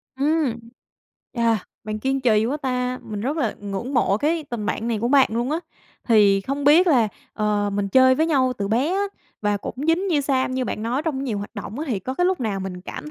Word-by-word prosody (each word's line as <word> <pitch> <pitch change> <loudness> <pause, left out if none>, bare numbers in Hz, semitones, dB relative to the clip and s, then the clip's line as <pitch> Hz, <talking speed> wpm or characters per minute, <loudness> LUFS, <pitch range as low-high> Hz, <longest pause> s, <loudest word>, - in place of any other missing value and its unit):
Ưm, 280 -3 +1 0.7
à, 230 -2 +2 0.3
bạn 215 0 -4
kiên 270 +3 -1
trì 220 -4 +3
quá 270 +5 -1
ta, 255 -3 -2
mình 210 -1 -6
rất 275 +8 -2
là 240 -9 0
ngưỡng 205 +7 -4
mộ 200 -5 +3
cái 315 +3 0
tình 225 -4 -3
bạn 225 +1 -2
này 230 -2 0
của 235 +3 -1
bạn 275 -1 +5
luôn 240 +4 -1
á, 315 - 0 0.5
thì 205 -3 +5
không 275 +6 -3
biết 320 +6 +6
là, 245 -9 +4 0.2
ờ, 210 -1 0
mình 200 0 -1
chơi 260 +4 +6
với 315 +4 +1
nhau 265 -5 +2
từ 200 0 -2
bé 255 +10 +1
á 395 - +1 0.4
và 205 -1 +1
cũng 200 - -6
dính 335 +4 +2
như 310 -4 +2
sam 260 -2 0
như 260 - 0
bạn 215 - -4
nói 245 +6 -1
trong 285 -4 -2
nhiều 225 -6 -2
hoạt 205 - -6
động 205 +3 -6
á, 310 - -2
thì 225 -6 0
có 255 +8 -5
cái 355 - +1
lúc 375 -6 0
nào 205 -4 -2
mình 185 -1 -5
cảm 300 +10 -8
250 Hz, 240 wpm, -23 LUFS, 210-280 Hz, 0.7 s, biết